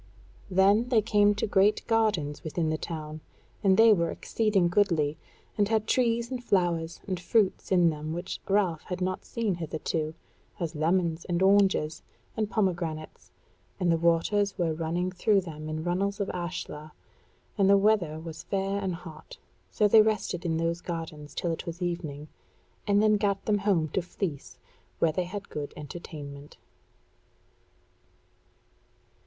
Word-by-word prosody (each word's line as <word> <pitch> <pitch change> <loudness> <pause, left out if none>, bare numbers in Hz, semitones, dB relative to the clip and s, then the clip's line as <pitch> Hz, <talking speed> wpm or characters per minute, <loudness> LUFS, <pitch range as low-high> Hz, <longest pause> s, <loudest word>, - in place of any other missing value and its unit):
Then 200 +5 +4
they 225 -4 +3
came 205 -1 +4
to 210 - -1
great 205 +1 +3
gardens 210 -11 0
within 160 0 -1
the 155 - 0
town, 155 -1 -6 0.4
and 190 -2 +4
they 225 0 +8
were 170 -4 +1
exceeding 210 -3 +1
goodly, 170 -6 +2 0.4
and 205 - +4
had 220 -1 +1
trees 235 0 +1
and 250 -1 -4
flowers 170 -5 0
and 185 -3 -3
fruits 195 +2 +1
in 175 -3 +5
them 155 0 -5
which 175 +3 -4
Ralph 190 -5 +2
had 180 - -4
not 185 0 -2
seen 225 -4 -1
hitherto, 160 -1 -3 0.4
as 170 -2 -3
lemons, 165 +1 0
and 175 +1 0
oranges, 190 -5 +3 0.3
and 215 -2 -1
pomegranates; 175 -7 -2 0.5
and 180 -2 +2
the 165 - +3
waters 170 +5 +1
were 170 -3 0
running 170 +3 -2
through 195 +2 +2
them 155 -3 -7
in 155 0 -3
runnels 195 +3 -1
of 200 - -1
ashlar; 170 -4 -6 0.6
and 195 -2 +3
the 200 - +7
weather 195 -7 +2
was 160 -1 -8
fair 195 0 -1
and 190 -3 -2
hot; 160 -2 -11 0.3
so 210 - +2
they 215 +1 +7
rested 215 -5 -1
in 165 -1 0
those 165 +1 -1
gardens 160 -4 -6
till 170 - -1
it 165 - -5
was 170 +1 -5
evening, 165 -5 -4 0.6
and 205 +1 +4
then 215 -1 +4
gat 200 -1 -1
them 210 -1 +2
home 190 -6 +2
to 190 - -1
Fleece, 170 -4 -5 0.4
where 165 - +2
they 180 +3 -1
had 200 +3 -7
good 145 -1 -6
entertainment. 145 -2 -9
180 Hz, 155 wpm, -28 LUFS, 160-200 Hz, 0.6 s, they